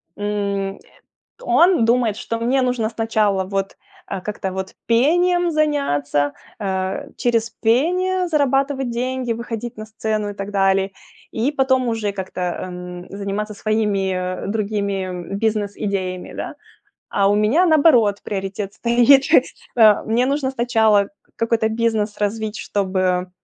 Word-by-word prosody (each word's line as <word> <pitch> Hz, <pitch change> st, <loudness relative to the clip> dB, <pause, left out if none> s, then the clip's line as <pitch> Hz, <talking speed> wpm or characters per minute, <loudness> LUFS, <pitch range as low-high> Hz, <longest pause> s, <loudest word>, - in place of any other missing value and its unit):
м. 200 Hz, -1 st, -2 dB, 0.6 s
Он 360 Hz, -, +4 dB
думает, 230 Hz, -3 st, +2 dB
что 230 Hz, -, -4 dB
мне 255 Hz, +3 st, +1 dB
нужно 245 Hz, -3 st, 0 dB
сначала 215 Hz, -4 st, +1 dB
вот, 195 Hz, +1 st, -3 dB, 0.3 s
а, 195 Hz, -, -4 dB
как-то 195 Hz, -1 st, -4 dB
вот 190 Hz, 0 st, -5 dB
пением 350 Hz, +9 st, +3 dB
заняться, 145 Hz, -, 0 dB, 0.2 s
а, 190 Hz, +4 st, -2 dB
через 230 Hz, -2 st, 0 dB
пение 360 Hz, +12 st, +1 dB
зарабатывать 275 Hz, -3 st, +1 dB
деньги, 250 Hz, 0 st, -2 dB
выходить 235 Hz, 0 st, -6 dB
на 215 Hz, -, -6 dB
сцену 215 Hz, -1 st, -2 dB
и -, -, -5 dB
так 200 Hz, 0 st, -6 dB
далее, 195 Hz, -1 st, +2 dB, 0.4 s
и 235 Hz, +6 st, 0 dB
потом 265 Hz, -3 st, +2 dB
уже 225 Hz, -3 st, -1 dB
как-то, 190 Hz, -2 st, -6 dB
ам, 180 Hz, 0 st, -5 dB
заниматься 200 Hz, +2 st, -4 dB
своими, 210 Hz, -2 st, 0 dB
э, 185 Hz, 0 st, -3 dB
другими 200 Hz, -3 st, -2 dB
бизнес-идеями, 200 Hz, -3 st, -2 dB
да. -, -, -5 dB, 0.6 s
А 200 Hz, -1 st, +2 dB
у -, -, +3 dB
меня 220 Hz, +12 st, +3 dB
наоборот 285 Hz, -, +5 dB
приоритет 195 Hz, 0 st, -4 dB
стоит. 245 Hz, +3 st, +5 dB, 0.5 s
А 215 Hz, -3 st, +6 dB
мне 235 Hz, +3 st, +1 dB
нужно 275 Hz, -1 st, 0 dB
сначала 225 Hz, -5 st, +2 dB, 0.3 s
какой-то 230 Hz, -1 st, +1 dB
бизнес 220 Hz, -2 st, 0 dB
развить, 215 Hz, +1 st, -2 dB
чтобы, 185 Hz, -2 st, -1 dB
215 Hz, 125 wpm, -20 LUFS, 195-245 Hz, 0.6 s, А